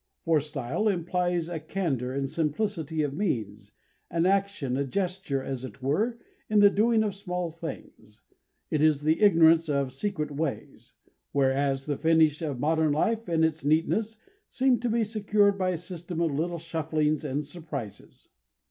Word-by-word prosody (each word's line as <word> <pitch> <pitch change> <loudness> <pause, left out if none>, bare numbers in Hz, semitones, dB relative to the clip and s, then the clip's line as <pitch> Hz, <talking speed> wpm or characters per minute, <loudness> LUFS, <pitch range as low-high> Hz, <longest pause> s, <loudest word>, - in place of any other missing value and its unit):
For 165 -2 +4
style 150 - -2
implies 175 -2 0
a 170 -2 -4
candour 155 -7 -2
and 135 +1 -2
simplicity 160 0 -1
of 145 -2 -2
means, 110 - -3 0.4
an 170 0 +1
action, 195 -9 +1
a 140 - 0
gesture, 180 -2 -2
as 130 -2 -4
it 130 0 -9
were, 210 - 0 0.3
in 215 - +2
the 205 -1 +7
doing 220 +2 +3
of 210 -2 -1
small 180 -3 -4
things; 155 -10 -10 0.5
it 150 - +1
is 155 -2 +3
the 155 +6 +2
ignorance 165 -4 +5
of 140 -3 0
secret 155 -2 -3
ways; 145 0 -5 0.4
whereas 135 0 +1
the 145 -2 -2
finish 160 -2 +3
of 145 -6 -3
modern 160 +1 +2
life 225 +9 0
and 160 -1 +3
its 160 -1 -2
neatness 185 +9 +1 0.3
seem 260 -2 +2
to 245 - -1
be 230 0 +2
secured 205 -2 +2
by 185 -1 +1
a 180 - -1
system 175 0 -7
of 165 -3 +1
little 170 +4 -1
shufflings 155 -2 -1
and 145 0 -2
surprises. 145 - -8
160 Hz, 160 wpm, -27 LUFS, 145-190 Hz, 0.5 s, the